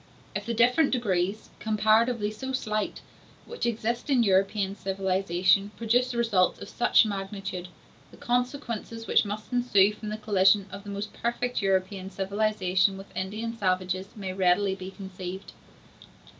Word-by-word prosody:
If 205 Hz, +1 st, -4 dB
the 235 Hz, -, -1 dB
different 250 Hz, +6 st, +4 dB
degrees—comparatively 215 Hz, +1 st, +1 dB
so 265 Hz, +5 st, -6 dB
slight—which 220 Hz, -, -4 dB
exist 235 Hz, +3 st, -2 dB
in 255 Hz, -4 st, +4 dB
European 195 Hz, 0 st, +2 dB
civilization 190 Hz, 0 st, +1 dB
produce 245 Hz, +2 st, +1 dB
results 210 Hz, -6 st, +2 dB
of -, -, -8 dB
such 240 Hz, -1 st, +4 dB
magnitude, 195 Hz, -2 st, -4 dB, 0.4 s
the -, -, -16 dB
consequences 240 Hz, -2 st, -2 dB
which -, -, +3 dB
must 210 Hz, +4 st, -6 dB
ensue 210 Hz, -5 st, +4 dB
from 210 Hz, 0 st, -7 dB
the 215 Hz, -, -3 dB
collision 200 Hz, -2 st, +3 dB
of 200 Hz, +1 st, -8 dB
the -, -, -7 dB
most 200 Hz, +1 st, -5 dB
perfect 240 Hz, +1 st, -2 dB
European 190 Hz, 0 st, 0 dB
civilization 195 Hz, -1 st, +1 dB
with 195 Hz, +1 st, -12 dB
Indian 215 Hz, +5 st, -3 dB
savages 185 Hz, -2 st, -1 dB
may 195 Hz, -3 st, -5 dB
readily 190 Hz, +1 st, +2 dB
be 190 Hz, -1 st, -7 dB
conceived. 190 Hz, -1 st, -8 dB
205 Hz, 130 wpm, -27 LUFS, 190-230 Hz, 0.4 s, different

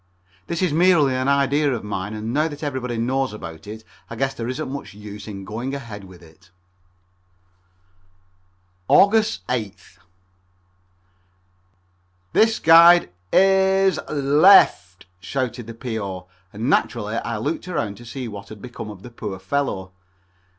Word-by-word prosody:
This 170 Hz, +2 st, -2 dB
is 175 Hz, -5 st, +1 dB
merely 165 Hz, -5 st, +4 dB
an 130 Hz, +1 st, -1 dB
idea 140 Hz, +1 st, +2 dB
of 120 Hz, -, -3 dB
mine, 105 Hz, 0 st, -4 dB
and 110 Hz, +2 st, -4 dB
now 155 Hz, +3 st, +2 dB
that 150 Hz, -1 st, -8 dB
everybody 130 Hz, -4 st, -3 dB
knows 130 Hz, +1 st, -1 dB
about 85 Hz, -3 st, -9 dB
it 110 Hz, +1 st, -8 dB, 0.3 s
I 115 Hz, -, -7 dB
guess 135 Hz, +3 st, -1 dB
there 115 Hz, -, -5 dB
isn't 130 Hz, +1 st, -4 dB
much 140 Hz, -6 st, -7 dB
use 105 Hz, 0 st, -10 dB
in 100 Hz, -2 st, -8 dB
going 120 Hz, +7 st, -4 dB
ahead 110 Hz, -7 st, -8 dB
with 90 Hz, -2 st, -15 dB
it. 80 Hz, +3 st, -20 dB, 2.4 s
Aug. 200 Hz, +2 st, +6 dB, 0.3 s
8th. 110 Hz, -6 st, -5 dB, 2.3 s
"This 225 Hz, +1 st, +3 dB
guide 170 Hz, -, +7 dB, 0.2 s
i -, -, -2 dB, 0.5 s
s 190 Hz, -, +2 dB
l 145 Hz, 0 st, +1 dB
e 190 Hz, -, +9 dB
f 90 Hz, -, +3 dB
t!" -, -, -19 dB
shouted 125 Hz, +3 st, -4 dB
the 115 Hz, -, -8 dB
P.O., 105 Hz, -7 st, -5 dB, 0.3 s
and 110 Hz, +4 st, -4 dB
naturally 115 Hz, -5 st, 0 dB
I 115 Hz, -1 st, -3 dB
looked 150 Hz, +11 st, -3 dB
around 115 Hz, -, -3 dB
to 120 Hz, -, -13 dB
see 125 Hz, +2 st, -6 dB
what 100 Hz, -2 st, -9 dB
had 110 Hz, -, -10 dB
become 120 Hz, -2 st, -8 dB
of 100 Hz, -3 st, -11 dB
the 125 Hz, -, -11 dB
poor 105 Hz, -4 st, -6 dB
fellow. 95 Hz, -3 st, -3 dB
120 Hz, 150 wpm, -22 LUFS, 105-140 Hz, 2.4 s, e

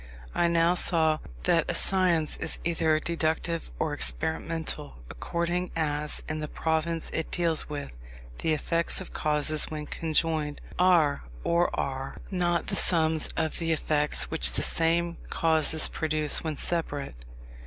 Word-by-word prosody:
I 175 Hz, -, +2 dB
now 170 Hz, +1 st, +3 dB
saw, 160 Hz, -3 st, +3 dB, 0.2 s
that -, -, +2 dB
a -, -, -1 dB
science 180 Hz, -5 st, +4 dB
is -, -, +4 dB
either 160 Hz, -2 st, +1 dB
deductive 165 Hz, 0 st, -2 dB
or -, -, -1 dB
experimental, 155 Hz, -, -2 dB, 0.2 s
according 175 Hz, -, -2 dB
as, 150 Hz, -2 st, -1 dB
in 155 Hz, 0 st, -3 dB
the 150 Hz, -, -4 dB
province 160 Hz, +1 st, -2 dB
it 160 Hz, -, -3 dB
deals 165 Hz, -3 st, 0 dB
with, 145 Hz, -, -7 dB, 0.4 s
the 160 Hz, -, 0 dB
effects 165 Hz, +2 st, +1 dB
of 190 Hz, -, -7 dB
causes 150 Hz, 0 st, +2 dB
when 150 Hz, -1 st, -5 dB
conjoined, 155 Hz, -2 st, -1 dB, 0.2 s
are 170 Hz, -, +3 dB, 0.2 s
or 170 Hz, +1 st, +2 dB
are 135 Hz, 0 st, -4 dB
not 175 Hz, -2 st, 0 dB
the -, -, -3 dB
sums 160 Hz, -3 st, +2 dB
of 160 Hz, -2 st, -1 dB
the 165 Hz, -1 st, -1 dB
effects 150 Hz, -1 st, 0 dB
which 160 Hz, -, +2 dB
the -, -, 0 dB
same 170 Hz, +1 st, 0 dB
causes 160 Hz, -1 st, +1 dB
produce 155 Hz, -2 st, +1 dB
when 155 Hz, -3 st, -3 dB
separate. 145 Hz, -, -3 dB
160 Hz, 140 wpm, -27 LUFS, 150-170 Hz, 0.4 s, science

